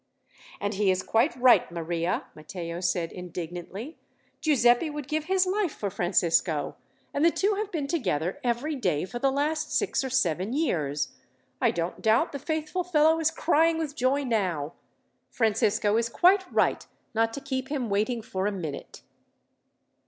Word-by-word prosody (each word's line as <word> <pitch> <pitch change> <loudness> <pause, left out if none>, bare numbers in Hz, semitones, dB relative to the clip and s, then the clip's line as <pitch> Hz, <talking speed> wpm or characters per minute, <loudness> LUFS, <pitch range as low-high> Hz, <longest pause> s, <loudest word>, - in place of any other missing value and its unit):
"And 205 +1 -2
he 200 0 +1
is 185 0 +1
quite 230 +1 +2
right, 250 -7 +5
Maria," 170 +1 -2
Matteo 170 +2 -6
said 175 -2 -1
indignantly. 180 - -7 0.4
"Giuseppi 260 -1 +3
would 295 -2 -6
give 305 +1 -1
his 380 +1 +2
life 380 -2 0
for 200 -2 -3
Francisco, 170 -4 +1 0.4
and 285 - 0
the 335 - +7
two 400 +5 +1
have 415 0 -3
been 310 -5 -2
together 185 - -1
every 245 +6 -1
day 180 - 0
for 240 +5 -6
the 275 - +2
last 300 +3 -1
six - - 0
or 265 - -3
seven 195 -4 0
years. 150 - 0 0.5
I - - +4
don't 170 +1 -3
doubt 220 +1 +3
the 280 - -5
faithful 315 +4 -2
fellow 320 -2 +3
is 320 -1 +3
crying 325 0 +2
with 310 -3 -3
joy 270 +2 +1
now. 185 - -1 0.6
Francisco 215 -2 +1
is 230 0 0
quite 370 +7 +3
right, - - +2 0.3
not 225 0 +2
to - - -4
keep 265 -1 -3
him 270 -4 -2
waiting 215 +3 0
for 190 -1 -2
a - - 0
minute." 160 -8 -7
235 Hz, 160 wpm, -27 LUFS, 180-300 Hz, 0.6 s, the